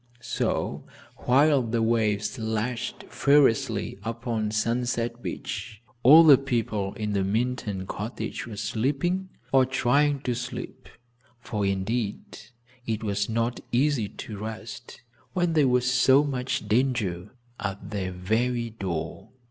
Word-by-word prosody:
So, -, -, -2 dB, 0.3 s
while 140 Hz, +2 st, +4 dB
the 115 Hz, -1 st, -1 dB
waves 110 Hz, +1 st, +1 dB
lashed 110 Hz, +2 st, -3 dB
furiously 140 Hz, -8 st, +2 dB
upon 115 Hz, 0 st, -2 dB
Sunset 115 Hz, +2 st, -1 dB
Beach, 105 Hz, -, -5 dB, 0.2 s
all 150 Hz, +7 st, +9 dB
the 145 Hz, -5 st, +8 dB
people 110 Hz, -7 st, -2 dB
in 105 Hz, -1 st, -3 dB
the 100 Hz, -1 st, +1 dB
Minturn 105 Hz, -2 st, -1 dB
cottage 105 Hz, +4 st, -5 dB
were 110 Hz, -3 st, -8 dB
sleeping, 150 Hz, -, -1 dB, 0.2 s
or 135 Hz, -1 st, +6 dB
trying 135 Hz, +2 st, +2 dB
to 125 Hz, -, -1 dB
sleep, 125 Hz, +1 st, -6 dB, 0.5 s
for, 105 Hz, -3 st, -2 dB
indeed, 100 Hz, +3 st, -2 dB, 0.5 s
it 110 Hz, -1 st, -2 dB
was 100 Hz, 0 st, -1 dB
not 115 Hz, +2 st, -1 dB
easy 125 Hz, -4 st, +2 dB
to 105 Hz, -3 st, -8 dB
rest 110 Hz, +3 st, -8 dB, 0.3 s
when 175 Hz, -2 st, +1 dB
there 150 Hz, -4 st, +4 dB
was 125 Hz, 0 st, +2 dB
so 130 Hz, +2 st, +5 dB
much 130 Hz, -6 st, -2 dB
danger 110 Hz, -5 st, 0 dB, 0.2 s
at 100 Hz, 0 st, -5 dB
their 95 Hz, -3 st, -2 dB
very 115 Hz, +6 st, -1 dB
door. 85 Hz, -7 st, -5 dB
115 Hz, 125 wpm, -26 LUFS, 105-130 Hz, 0.5 s, all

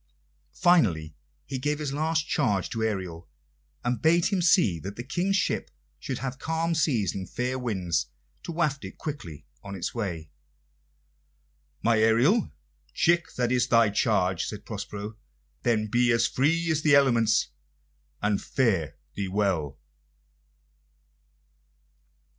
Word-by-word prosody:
Finally 90 Hz, -, +3 dB, 0.3 s
he 135 Hz, -, -4 dB
gave 150 Hz, +3 st, 0 dB
his 145 Hz, -2 st, -3 dB
last 155 Hz, +1 st, 0 dB
charge 105 Hz, -, 0 dB
to 115 Hz, -, -3 dB
Ariel, 95 Hz, -7 st, -3 dB, 0.5 s
and 120 Hz, -2 st, -1 dB
bade 165 Hz, +2 st, +4 dB
him 195 Hz, -3 st, 0 dB
see 115 Hz, -, +4 dB
that 100 Hz, +4 st, -7 dB
the 120 Hz, -, -6 dB
King's 175 Hz, +9 st, 0 dB
ship -, -, 0 dB, 0.3 s
should 130 Hz, -, -4 dB
have 130 Hz, -1 st, -5 dB
calm 165 Hz, +1 st, -1 dB
seas 125 Hz, -, +1 dB
and 95 Hz, -2 st, -6 dB
fair 125 Hz, +1 st, -2 dB
winds 95 Hz, -11 st, -1 dB, 0.3 s
to -, -, -6 dB
waft 155 Hz, -6 st, -1 dB
it 95 Hz, -, -9 dB
quickly 85 Hz, -, -7 dB, 0.2 s
on 100 Hz, -1 st, -7 dB
its 90 Hz, -, -4 dB
way. 85 Hz, -9 st, -4 dB, 1.5 s
"My 115 Hz, -1 st, +3 dB
Ariel, 120 Hz, -, +3 dB, 0.4 s
chick, 175 Hz, 0 st, +2 dB
that 120 Hz, -1 st, 0 dB
is 125 Hz, -1 st, +2 dB
thy 115 Hz, -3 st, +4 dB
charge," 95 Hz, -4 st, +1 dB
said 105 Hz, -1 st, -7 dB
Prospero. 105 Hz, 0 st, -6 dB, 0.4 s
"Then 115 Hz, -3 st, +1 dB
be 120 Hz, +2 st, +3 dB
free 160 Hz, +8 st, +1 dB
as 155 Hz, -1 st, +1 dB
the 155 Hz, -2 st, +5 dB
elements, 120 Hz, -5 st, +3 dB, 0.7 s
and 105 Hz, -1 st, +1 dB
fare 100 Hz, -, 0 dB, 0.2 s
thee 100 Hz, -1 st, -3 dB
well!" 90 Hz, -8 st, -1 dB
115 Hz, 130 wpm, -27 LUFS, 100-150 Hz, 1.5 s, the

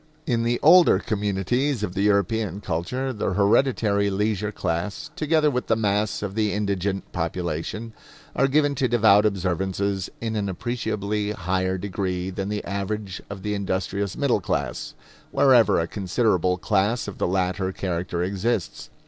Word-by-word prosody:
In 120 Hz, -7 st, +1 dB
the 120 Hz, +1 st, 0 dB
older 170 Hz, -, +7 dB
communities 105 Hz, +6 st, -1 dB
of 90 Hz, -, -2 dB
the 100 Hz, -, -1 dB
European 105 Hz, -1 st, +1 dB
culture, 105 Hz, +9 st, -2 dB
the 105 Hz, -3 st, -2 dB
hereditary 100 Hz, 0 st, +2 dB
leisure 105 Hz, +1 st, -1 dB
class, 95 Hz, -, -3 dB
together 155 Hz, -1 st, +2 dB
with 125 Hz, -1 st, -2 dB
the 110 Hz, -, +3 dB
mass 105 Hz, -1 st, 0 dB
of 100 Hz, -2 st, -3 dB
the 105 Hz, -1 st, 0 dB
indigent 100 Hz, -1 st, -2 dB
population, 85 Hz, +6 st, -3 dB, 0.4 s
are 135 Hz, -, +3 dB
given 145 Hz, +1 st, +2 dB
to 130 Hz, -1 st, +1 dB
devout 110 Hz, -3 st, +5 dB
observances 95 Hz, 0 st, -1 dB
in 110 Hz, -1 st, -3 dB
an 100 Hz, -2 st, -1 dB
appreciably 105 Hz, 0 st, -2 dB
higher 95 Hz, 0 st, -1 dB
degree 95 Hz, -1 st, -3 dB
than 95 Hz, +1 st, -4 dB
the 105 Hz, 0 st, -3 dB
average 100 Hz, 0 st, -4 dB
of 100 Hz, -1 st, -7 dB
the 105 Hz, -, -1 dB
industrious 100 Hz, 0 st, -2 dB
middle 135 Hz, -8 st, +1 dB
class, -, -, -3 dB, 0.3 s
wherever 130 Hz, -8 st, +5 dB
a 85 Hz, -, 0 dB
considerable 95 Hz, -1 st, 0 dB
class 105 Hz, +5 st, 0 dB
of 100 Hz, -, -7 dB
the -, -, +1 dB
latter 95 Hz, +1 st, 0 dB
character 90 Hz, -2 st, -2 dB
exists. 100 Hz, +2 st, -2 dB
100 Hz, 150 wpm, -24 LUFS, 95-115 Hz, 0.4 s, older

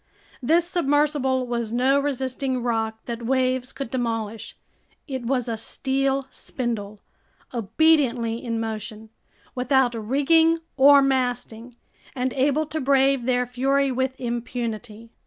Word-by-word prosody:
This 325 Hz, +7 st, +3 dB
submersible 290 Hz, -6 st, +1 dB
was 235 Hz, -2 st, -3 dB
no 260 Hz, +4 st, +3 dB
resisting 265 Hz, -2 st, -2 dB
rock 225 Hz, -2 st, -1 dB
that 235 Hz, -1 st, -5 dB
waves 255 Hz, +1 st, 0 dB
could 275 Hz, -4 st, -6 dB
demolish; 225 Hz, -3 st, -3 dB, 0.5 s
it 260 Hz, -4 st, -4 dB
was 250 Hz, -2 st, 0 dB
a 230 Hz, -1 st, -2 dB
steel 270 Hz, +4 st, -1 dB
spindle, 215 Hz, -5 st, -5 dB, 0.5 s
obediently 240 Hz, -1 st, +2 dB
in 230 Hz, -2 st, -2 dB
motion, 220 Hz, 0 st, -5 dB, 0.4 s
without 255 Hz, -1 st, +2 dB
rigging 290 Hz, +9 st, +3 dB, 0.2 s
or 280 Hz, +1 st, +7 dB
masting, 245 Hz, -3 st, -2 dB, 0.4 s
and 255 Hz, 0 st, -1 dB
able 285 Hz, +3 st, +1 dB
to 310 Hz, +1 st, -4 dB
brave 270 Hz, -1 st, +2 dB
their 250 Hz, -1 st, +2 dB
fury 270 Hz, +3 st, +1 dB
with 260 Hz, +1 st, -2 dB
impunity. 235 Hz, -2 st, -5 dB
255 Hz, 120 wpm, -24 LUFS, 235-275 Hz, 0.5 s, or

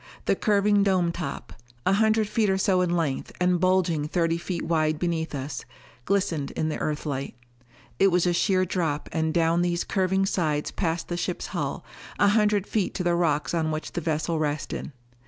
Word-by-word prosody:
The -, -, +3 dB
curving 205 Hz, -1 st, +3 dB
dome 185 Hz, -4 st, +2 dB
top 165 Hz, -5 st, -6 dB, 0.3 s
a 190 Hz, -, +3 dB
hundred 220 Hz, +1 st, +3 dB
feet 215 Hz, -1 st, +1 dB
or 190 Hz, -, +2 dB
so 190 Hz, -1 st, +2 dB
in 175 Hz, -1 st, +1 dB
length, 150 Hz, -5 st, -2 dB
and 180 Hz, 0 st, +2 dB
bulging 180 Hz, -4 st, +2 dB
thirty 165 Hz, 0 st, 0 dB
feet 170 Hz, 0 st, -4 dB
wide 155 Hz, -2 st, +1 dB
beneath 165 Hz, -2 st, -2 dB
us 135 Hz, 0 st, -5 dB, 0.4 s
glistened 185 Hz, -7 st, 0 dB
in 155 Hz, -, -2 dB
the 155 Hz, -, -3 dB
Earthlight. 145 Hz, -3 st, -3 dB, 0.6 s
It 195 Hz, -, +6 dB
was 180 Hz, -2 st, +2 dB
a 175 Hz, -, +2 dB
sheer 185 Hz, +1 st, +2 dB
drop 165 Hz, -5 st, -2 dB
and 160 Hz, -1 st, 0 dB
down 165 Hz, +1 st, +2 dB
these 175 Hz, -1 st, 0 dB
curving 190 Hz, 0 st, +1 dB
sides 155 Hz, -6 st, 0 dB
past 170 Hz, -2 st, -2 dB
the 175 Hz, -, -3 dB
ship's -, -, -3 dB
hull, -, -, -3 dB, 0.3 s
a 205 Hz, -, +4 dB
hundred 210 Hz, -2 st, +2 dB
feet 210 Hz, -3 st, -1 dB
to 185 Hz, -, -1 dB
the 175 Hz, -1 st, +2 dB
rocks 155 Hz, -5 st, +1 dB
on 160 Hz, -2 st, +1 dB
which 155 Hz, 0 st, -4 dB
the 175 Hz, -, -3 dB
vessel 160 Hz, +1 st, -1 dB
rested. 150 Hz, 0 st, -3 dB
175 Hz, 185 wpm, -26 LUFS, 155-190 Hz, 0.6 s, It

